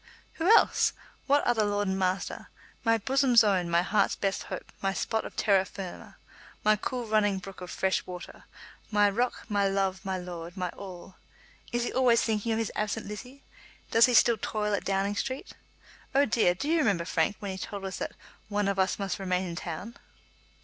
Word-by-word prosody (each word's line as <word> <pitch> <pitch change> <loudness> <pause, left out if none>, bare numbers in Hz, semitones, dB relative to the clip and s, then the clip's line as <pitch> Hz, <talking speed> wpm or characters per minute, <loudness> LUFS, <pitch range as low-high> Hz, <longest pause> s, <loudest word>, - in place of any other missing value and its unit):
"Who 345 - +3
else? - - +3 0.3
What 285 +1 +4
other 230 -3 +2
lord 205 0 0
and 190 - 0
master? 185 0 -2 0.3
My 230 -1 +4
bosom's 255 0 +4
own; 185 -4 +1
my 170 +1 +3
heart's 200 +1 +2
best 195 -1 -1
hope; - - -7
my 195 0 0
spot 220 +2 -1
of - - -8
terra 195 -3 +3
firma; 190 -2 -8 0.5
my 215 0 +5
cool 245 +3 -3
running 210 -2 +2
brook 190 0 -9
of 180 - -7
fresh 190 +1 0
water; 180 0 -9 0.4
my 210 -1 +4
rock; 245 +5 -1
my 205 -3 +2
love; 195 0 0
my 190 -2 -2
lord; 175 -1 -7
my 180 -1 -1
all! 185 0 -10 0.5
Is 240 0 0
he - - -3
always 250 -3 +4
thinking 220 0 0
of 220 - +1
his 225 -2 -1
absent 210 +1 -2
Lizzie? 250 +7 -9 0.5
Does 230 +2 +6
he 250 - +2
still 230 0 +5
toil 210 -1 -1
at 200 - -1
Downing 195 +1 0
Street? 265 +3 -4 0.6
Oh, 280 +1 +5
dear; 210 -7 +2
do 280 - -4
you 330 +1 +3
remember, 200 - +1
Frank, 160 +6 +1
when 200 -2 -5
he 190 - -5
told 200 +1 -6
us 190 -1 -4
that - - -4 0.4
'one 205 -1 0
of 200 -1 0
us 190 0 +2
must 195 -1 -3
remain 185 -1 0
in 170 - -5
town?'" 180 +6 -6
205 Hz, 195 wpm, -28 LUFS, 190-225 Hz, 0.6 s, Does